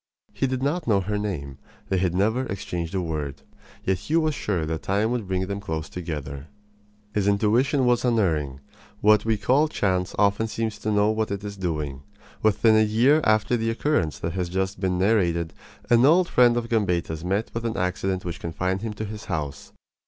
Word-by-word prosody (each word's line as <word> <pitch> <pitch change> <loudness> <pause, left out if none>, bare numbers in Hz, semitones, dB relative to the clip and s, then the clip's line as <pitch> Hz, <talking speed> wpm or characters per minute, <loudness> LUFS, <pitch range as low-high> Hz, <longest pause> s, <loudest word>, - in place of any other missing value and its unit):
He 135 - 0
did 130 0 -2
not 155 +3 -1
know 100 -4 +3
her 105 +2 -2
name. 70 -10 -4 0.3
They 95 - +1
had 90 -1 0
never 110 +7 +1
exchanged 90 -2 -4
a 95 - +1
word. 75 -5 -4 0.4
Yet 95 -2 +1
he 105 - -2
was 155 -2 +2
sure 95 - -1
that 80 +1 -3
time 105 +4 0
would 120 -5 -2
bring 95 0 -1
them 100 +1 -4
close 80 -6 -4
together. 75 -5 -6 0.7
His 105 -2 0
intuition 115 +7 +2
was 120 -1 +3
unerring. 80 - 0 0.4
What 105 0 +5
we 110 -1 +2
call 135 +8 +3
chance 95 -10 -1
often 100 +2 +2
seems 110 -1 -3
to 110 - -2
know 105 +1 +3
what 110 0 -1
it 100 0 -4
is 100 -1 -5
doing. 75 -7 -3 0.4
Within 110 +1 +4
a 110 - +5
year 120 +8 +4
after 110 +2 +3
the 115 -1 0
occurrence 115 - 0
that 85 0 -4
has 90 -2 -2
just 95 +1 -2
been 95 -2 0
narrated 90 -5 +1 0.3
an 120 0 +5
old 170 +6 +5
friend 120 -4 +4
of 120 -1 -2
Gambetta's 90 -8 0
met 100 +5 -1
with 115 - -3
an 115 -1 -2
accident 90 +1 -1
which 85 -1 -5
confined 90 +3 -2
him 110 -1 -4
to 110 - -4
his 105 0 -7
house. 75 -3 -4
100 Hz, 195 wpm, -25 LUFS, 90-115 Hz, 0.7 s, What